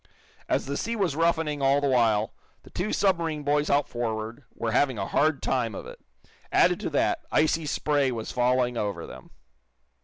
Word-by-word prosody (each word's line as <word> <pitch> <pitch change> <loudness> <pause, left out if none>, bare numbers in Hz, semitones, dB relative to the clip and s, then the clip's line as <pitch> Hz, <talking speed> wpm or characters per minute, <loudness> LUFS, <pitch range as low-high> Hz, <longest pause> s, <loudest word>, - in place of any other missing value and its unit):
As - - +1
the 140 +1 -3
sea 230 +1 -2
was 190 -9 0
roughening 160 -3 +1
all 135 +1 +4
the 145 - 0
while, 115 -5 +2 0.3
the - - -16
two 190 +4 -2
submarine 165 -6 0
boys 145 +1 +1
out 145 0 +2
forward 115 +1 -4
were 115 -1 -2
having 130 0 +2
a 95 - -2
hard 155 +5 +1
time 120 -5 0
of - - -7
it. - - -10 0.5
Added - - +4
to - - -3
that, - - +1
icy 155 0 +2
spray 145 -2 +1
was 115 -2 -5
falling 125 0 +1
over 100 -6 -3
them. 65 - -12
135 Hz, 180 wpm, -26 LUFS, 115-150 Hz, 0.5 s, all